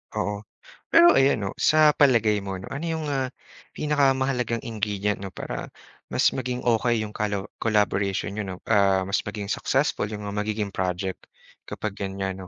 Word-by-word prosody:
Oo, 105 Hz, 0 st, -1 dB, 0.5 s
pero, 340 Hz, +1 st, +7 dB
ayan 135 Hz, -2 st, +4 dB
'no, 95 Hz, -, -2 dB
sa 155 Hz, -1 st, +5 dB
palagay 115 Hz, -8 st, +3 dB
mo, 100 Hz, -1 st, -5 dB
'no, 95 Hz, +1 st, -8 dB
ano 145 Hz, +5 st, -4 dB
yung, 160 Hz, -1 st, -2 dB
ah, 135 Hz, -2 st, 0 dB, 0.5 s
pinakamahalagang 135 Hz, -5 st, +1 dB
ingredient, 105 Hz, -2 st, -2 dB
'no, 95 Hz, -1 st, -8 dB
para -, -, -5 dB, 0.4 s
mas -, -, +2 dB
maging 125 Hz, -1 st, -3 dB
okay 120 Hz, -1 st, +2 dB
yung 105 Hz, -, -6 dB
calo 105 Hz, -1 st, -3 dB
collaboration 100 Hz, -3 st, +1 dB
niyo, 105 Hz, +1 st, -3 dB
'no, 95 Hz, -1 st, -6 dB
ah, 100 Hz, -2 st, +4 dB
mas 95 Hz, +1 st, 0 dB
maging 105 Hz, 0 st, -4 dB
successful, 135 Hz, -5 st, 0 dB
yung 105 Hz, 0 st, -6 dB
magiging 105 Hz, 0 st, -2 dB
project, 95 Hz, 0 st, -3 dB, 0.4 s
kapag 110 Hz, -, -4 dB
ganyan, 95 Hz, -1 st, -3 dB
'no? 95 Hz, -, -9 dB
105 Hz, 160 wpm, -25 LUFS, 100-130 Hz, 0.5 s, pero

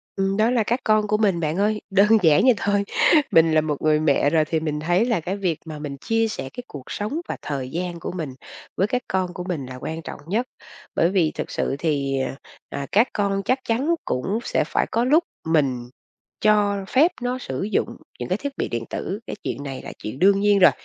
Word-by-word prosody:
Ừm, 195 Hz, +1 st, 0 dB
đó 220 Hz, +2 st, +3 dB
là 240 Hz, -3 st, +2 dB
các 240 Hz, +4 st, 0 dB
con 215 Hz, -1 st, +3 dB
của 210 Hz, +1 st, +2 dB
mình 200 Hz, -5 st, +2 dB
bạn 155 Hz, 0 st, -1 dB
ơi, 210 Hz, +1 st, +1 dB
đơn 200 Hz, +1 st, +4 dB, 0.2 s
giản 155 Hz, -3 st, +6 dB
vậy 255 Hz, 0 st, +6 dB
thôi. 205 Hz, 0 st, +1 dB, 0.5 s
Mình 165 Hz, 0 st, +5 dB
là 155 Hz, -, +5 dB
một 150 Hz, -2 st, -3 dB
người 155 Hz, -1 st, +3 dB
mẹ 145 Hz, -2 st, +3 dB
rồi 155 Hz, 0 st, +3 dB
thì 160 Hz, +1 st, 0 dB
mình 155 Hz, -1 st, -2 dB
thấy 175 Hz, +7 st, +2 dB
là 230 Hz, -6 st, +1 dB
cái 180 Hz, +4 st, -3 dB
việc 180 Hz, -5 st, -1 dB
mà 155 Hz, -2 st, -7 dB
mình 145 Hz, -2 st, -5 dB
chia 225 Hz, +9 st, +1 dB
sẻ 135 Hz, -11 st, -5 dB
cái 245 Hz, -, -7 dB
cuộc 140 Hz, -3 st, -9 dB
sống 255 Hz, +11 st, -3 dB
và -, -, -4 dB
thời 135 Hz, -3 st, -4 dB
gian 175 Hz, +2 st, -4 dB
của -, -, -5 dB
mình 160 Hz, -7 st, -5 dB, 0.4 s
với 195 Hz, -, +2 dB
các 250 Hz, +3 st, -1 dB
con 185 Hz, -1 st, -1 dB
của 180 Hz, -, -5 dB
mình 175 Hz, -7 st, -3 dB
là 130 Hz, 0 st, -8 dB
quan 160 Hz, +5 st, -5 dB
trọng -, -, -8 dB
nhất. 220 Hz, +8 st, 0 dB, 0.5 s
Bởi 170 Hz, -, +3 dB
vì 180 Hz, -5 st, +2 dB
thực -, -, -4 dB
sự -, -, -1 dB
thì, 140 Hz, -4 st, 0 dB, 0.5 s
à, 140 Hz, 0 st, -4 dB
các 220 Hz, +5 st, +4 dB
con 200 Hz, -1 st, 0 dB
chắc 255 Hz, +4 st, +2 dB
chắn 270 Hz, +9 st, +1 dB
cũng 190 Hz, -, -1 dB
sẽ -, -, +1 dB
phải -, -, +1 dB
có 230 Hz, -, +2 dB
lúc 305 Hz, +6 st, +4 dB, 0.2 s
mình 135 Hz, -7 st, +1 dB, 0.5 s
cho 205 Hz, -2 st, +3 dB
phép 310 Hz, +7 st, +4 dB
nó 245 Hz, +1 st, -1 dB
sử 135 Hz, -, -4 dB
dụng 210 Hz, -, -1 dB, 0.2 s
những -, -, -4 dB
cái -, -, +1 dB
thiết 285 Hz, -1 st, -5 dB
bị -, -, -1 dB
điện 115 Hz, -1 st, -3 dB
tử, 200 Hz, -, -4 dB
cái -, -, -4 dB
chuyện 140 Hz, -, -4 dB
này 135 Hz, -2 st, -6 dB
là -, -, -8 dB
chuyện 110 Hz, +6 st, -5 dB
đương 195 Hz, +1 st, +5 dB
nhiên 205 Hz, 0 st, +4 dB
rồi, 185 Hz, -, +8 dB
185 Hz, 235 wpm, -23 LUFS, 155-215 Hz, 0.5 s, rồi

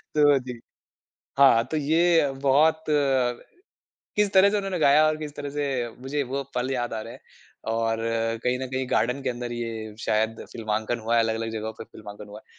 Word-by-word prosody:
तो 145 Hz, -2 st, +5 dB
जी। 125 Hz, -2 st, -8 dB, 0.8 s
हाँ, 130 Hz, -5 st, +6 dB
तो 155 Hz, -, 0 dB
ये 160 Hz, 0 st, +3 dB, 0.2 s
बहुत 160 Hz, +4 st, +4 dB, 1.3 s
किस 210 Hz, -1 st, +2 dB
तरह 190 Hz, +1 st, +7 dB
से 210 Hz, -, 0 dB
उन्होंने 195 Hz, -3 st, -2 dB
गाया 150 Hz, 0 st, +5 dB
और 155 Hz, 0 st, +1 dB
किस 150 Hz, -2 st, -7 dB
तरह 145 Hz, 0 st, -5 dB
से 145 Hz, -, 0 dB, 0.4 s
मुझे 140 Hz, +2 st, -2 dB
वो 140 Hz, -, -1 dB
पल 125 Hz, +1 st, -1 dB
याद 120 Hz, -2 st, -2 dB
आ 110 Hz, -, -3 dB
रहे -, -, -8 dB
हैं। -, -, -13 dB, 0.5 s
और 115 Hz, 0 st, 0 dB, 0.5 s
कहीं 125 Hz, 0 st, +1 dB
न 130 Hz, -, -4 dB
कहीं 130 Hz, 0 st, -1 dB
गार्डन 125 Hz, +5 st, +1 dB
के -, -, -1 dB
अंदर 120 Hz, 0 st, -5 dB
ये 120 Hz, -1 st, -3 dB, 0.3 s
शायद 110 Hz, 0 st, 0 dB
फ़िल्मांकन 110 Hz, +1 st, -2 dB
हुआ 115 Hz, -, +2 dB
है, 115 Hz, -, +5 dB
अलग-अलग 115 Hz, 0 st, -2 dB
जगहों 110 Hz, 0 st, -4 dB
पर -, -, -7 dB
फिल्मांकन 105 Hz, 0 st, -11 dB
हुआ 105 Hz, +1 st, -10 dB
है। -, -, -32 dB
130 Hz, 190 wpm, -25 LUFS, 115-150 Hz, 1.3 s, तरह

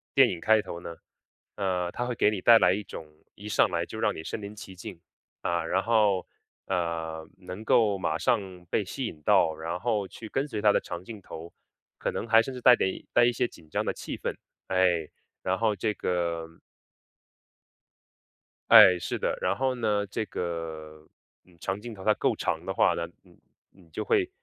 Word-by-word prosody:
电 -, -, +7 dB
影 90 Hz, -, -4 dB
开 110 Hz, +4 st, +4 dB
头 85 Hz, -, -7 dB
呢， 85 Hz, -1 st, -8 dB, 0.6 s
呃， 90 Hz, -3 st, -1 dB
它 120 Hz, -, -3 dB
会 125 Hz, 0 st, -3 dB
给 105 Hz, -, +3 dB
你 105 Hz, -, -3 dB
带 115 Hz, +3 st, +8 dB
来 90 Hz, -2 st, +4 dB
一 105 Hz, -, -2 dB
种， 80 Hz, -, -9 dB, 0.3 s
一 105 Hz, +1 st, -9 dB
上 95 Hz, -, +3 dB
来 85 Hz, -1 st, -1 dB
就 110 Hz, -, -8 dB
让 105 Hz, -, +1 dB
你 80 Hz, -, -7 dB
身 105 Hz, -, -5 dB
临 100 Hz, +1 st, -8 dB
其 100 Hz, -2 st, -10 dB
境， 95 Hz, -2 st, -9 dB, 0.4 s
啊， 85 Hz, -1 st, -1 dB
然 95 Hz, +3 st, 0 dB
后， 105 Hz, -5 st, +2 dB, 0.4 s
呃， 80 Hz, -3 st, -2 dB
能 90 Hz, +3 st, -8 dB
够 105 Hz, -4 st, +3 dB
马 80 Hz, -4 st, -1 dB
上 90 Hz, +1 st, -1 dB
被 105 Hz, -, 0 dB
吸 130 Hz, +8 st, -4 dB
引 80 Hz, -9 st, -7 dB
到， 80 Hz, -, +4 dB
然 80 Hz, +2 st, -4 dB
后 105 Hz, -2 st, -1 dB
去 110 Hz, +3 st, -10 dB
跟 135 Hz, +5 st, -1 dB
随 110 Hz, -7 st, -4 dB
它 105 Hz, -1 st, +5 dB
的 -, -, +3 dB
长 85 Hz, +1 st, -7 dB
镜 105 Hz, +1 st, -9 dB
头， 85 Hz, -2 st, -9 dB, 0.5 s
可 -, -, -2 dB
能 -, -, -4 dB
还 115 Hz, 0 st, +6 dB
是 -, -, -5 dB
甚 135 Hz, -, -4 dB
至 125 Hz, -, -7 dB
带 125 Hz, -, +8 dB
点 95 Hz, -4 st, -2 dB
带 120 Hz, -, +6 dB
一 120 Hz, -, +2 dB
些 125 Hz, -, +1 dB
紧 80 Hz, -7 st, -17 dB
张 -, -, -1 dB
的 -, -, +1 dB
气 -, -, -6 dB
氛， -, -, -3 dB, 0.3 s
哎， 90 Hz, -4 st, +2 dB, 0.3 s
然 95 Hz, 0 st, 0 dB
后 110 Hz, -2 st, +2 dB
这 105 Hz, +2 st, -1 dB
个 85 Hz, -3 st, -2 dB, 2.2 s
哎， 90 Hz, -1 st, +9 dB
是 -, -, -4 dB
的， -, -, -1 dB
然 -, -, +1 dB
后 130 Hz, -1 st, 0 dB
呢， 105 Hz, -4 st, 0 dB
这 110 Hz, +3 st, -3 dB
个， 80 Hz, -4 st, -6 dB, 0.4 s
嗯， 90 Hz, -, -23 dB
长 95 Hz, +3 st, -3 dB
镜 115 Hz, +1 st, -8 dB
头 95 Hz, -, -10 dB
它 105 Hz, -, +4 dB
够 -, -, 0 dB
长 -, -, -2 dB
的 -, -, -2 dB
话 -, -, +3 dB
呢， -, -, -3 dB, 0.2 s
你 -, -, -22 dB, 0.3 s
你 90 Hz, -4 st, -21 dB
就 -, -, -4 dB
会 390 Hz, -5 st, +2 dB
95 Hz, 220 characters per minute, -27 LUFS, 85-110 Hz, 2.2 s, 哎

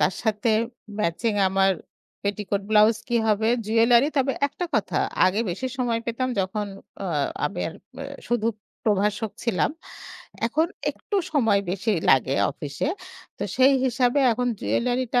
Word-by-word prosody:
তার -, -, +3 dB
সাথে 220 Hz, +1 st, +1 dB, 0.5 s
ম্যাচিং 205 Hz, +5 st, 0 dB
আমার 195 Hz, 0 st, +3 dB, 0.5 s
পেটিকোট 200 Hz, -1 st, -1 dB
ব্লাউজ 215 Hz, +1 st, +5 dB
কি 240 Hz, -, +1 dB
হবে? 215 Hz, +1 st, +2 dB, 0.2 s
জুয়েলারি। 235 Hz, +4 st, +4 dB
তবে 270 Hz, 0 st, +2 dB, 0.2 s
একটা 355 Hz, -, -5 dB
কথা -, -, +1 dB, 0.3 s
আগে 195 Hz, +4 st, +1 dB
বেশি 200 Hz, +9 st, -3 dB
সময় 235 Hz, -2 st, 0 dB
পেতাম 240 Hz, +2 st, -1 dB
যখন 205 Hz, +2 st, -2 dB, 0.4 s
অ -, -, -2 dB, 0.4 s
আমি -, -, -5 dB
আর 165 Hz, -, -9 dB, 0.3 s
আ -, -, -6 dB, 0.2 s
শুধু 235 Hz, -2 st, +1 dB, 0.4 s
প্রভাষক 210 Hz, +1 st, +1 dB
ছিলাম। 230 Hz, +1 st, +1 dB, 0.8 s
এখন 310 Hz, +7 st, +1 dB, 0.2 s
একটু 410 Hz, -, -5 dB, 0.2 s
সময় 225 Hz, -9 st, +3 dB
বেশি 200 Hz, +4 st, 0 dB, 0.2 s
লাগে 135 Hz, 0 st, +4 dB, 0.2 s
অফিসে। 145 Hz, -, -4 dB, 0.5 s
তো -, -, -3 dB
সেই 265 Hz, +2 st, +6 dB
হিসাবে 250 Hz, +1 st, +2 dB
এখন 245 Hz, +2 st, -1 dB
জুয়েলারি 250 Hz, +1 st, 0 dB
টা 245 Hz, -, +5 dB
225 Hz, 140 wpm, -24 LUFS, 200-245 Hz, 0.8 s, সেই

